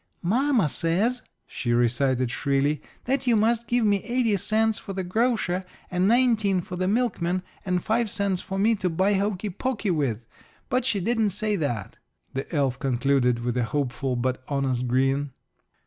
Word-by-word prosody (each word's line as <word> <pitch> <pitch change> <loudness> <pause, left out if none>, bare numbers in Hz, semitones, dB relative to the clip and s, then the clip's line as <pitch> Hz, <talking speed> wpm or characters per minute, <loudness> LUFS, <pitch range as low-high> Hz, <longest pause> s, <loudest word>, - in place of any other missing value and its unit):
"Mamma 240 - +2
says," 195 - 0 0.2
she 120 -3 -2
recited 120 +1 +1
shrilly, 140 +2 0 0.2
"that 265 +1 0
you 240 - +5
must 225 +2 +2
give 240 0 +2
me 200 -2 +2
eighty 235 -2 +1
cents 215 +2 +1
for 195 - -7
the 190 0 -3
grocer 190 -2 0 0.3
and 180 +1 +2
nineteen 220 -5 +3
for 180 +1 -6
the 185 +1 -1
milkman 185 -5 0 0.2
and 180 -1 0
five 225 0 +1
cents 200 -3 -1
for 195 - -5
me 215 +4 +3
to 185 -4 -1
buy 190 +5 +2
hokey 200 0 -1
pokey 215 0 -2
with 125 -8 -1 0.4
but 255 -2 +1
she 215 -6 +1
didn't 220 +2 +1
say 210 +2 -1
that," 120 - -3 0.4
the 135 +1 -4
elf 135 -5 0
concluded, 125 -2 +1
with 120 0 -1
a 125 - +1
hopeful 135 0 -2
but 130 +1 -1
honest 130 -3 -1
grin. 135 +3 +1
185 Hz, 165 wpm, -25 LUFS, 135-220 Hz, 0.4 s, you